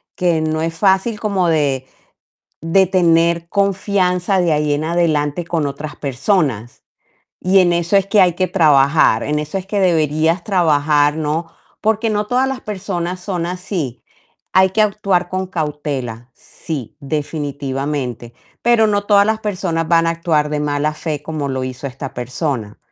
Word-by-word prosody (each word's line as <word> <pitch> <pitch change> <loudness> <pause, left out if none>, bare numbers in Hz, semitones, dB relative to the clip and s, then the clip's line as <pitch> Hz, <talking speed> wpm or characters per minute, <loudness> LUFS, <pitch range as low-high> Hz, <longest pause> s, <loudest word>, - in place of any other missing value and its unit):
que 175 -3 +1
no 155 0 -1
es 165 0 -2
fácil 200 +3 +2
como 195 -5 0
de 140 -4 0 0.7
de 175 +4 +3
tener 170 -2 +2
confianza 195 -1 +1
de 170 - +1
ahí 150 -1 +1
en 150 +2 -1
adelante 165 -1 0
con 165 -4 -1
otras 145 +2 -6
personas. 135 - -1 0.6
Y 190 +1 +4
en 175 -1 +3
eso 170 +3 +1
es 195 -1 +3
que 205 0 +3
hay 180 -3 +4
que 185 0 0
trabajar, 140 -7 +4
en 150 +1 -1
eso 150 +5 -4
es 185 - -7
que 200 0 -1
deberías 160 0 +1
trabajar, 150 -5 +2
¿no? 160 +2 -2 0.3
Porque 220 +1 +1
no 210 0 -1
todas 250 +4 +1
las 265 -1 -4
personas 185 -3 -4
son 180 -3 -3
así. 175 - -4 0.5
Hay 190 0 +5
que 215 - +3
actuar 195 -4 0
con 185 0 -2
cautela, 145 -8 -4
sí, 145 -5 -7
definitivamente, 140 -4 -4 0.3
pero 235 -2 +4
no 205 -1 0
todas 205 -1 +5
las 220 0 0
personas 180 -6 -2
van 165 -1 +4
a - - +2
actuar 160 -3 0
de 150 - -1
mala 145 +1 0
fe 150 -2 -4
como 155 -3 -4
lo 130 -1 -2
hizo 130 +2 -6
esta 135 +1 -7
persona. 125 -3 -4
165 Hz, 160 wpm, -18 LUFS, 145-190 Hz, 0.7 s, Hay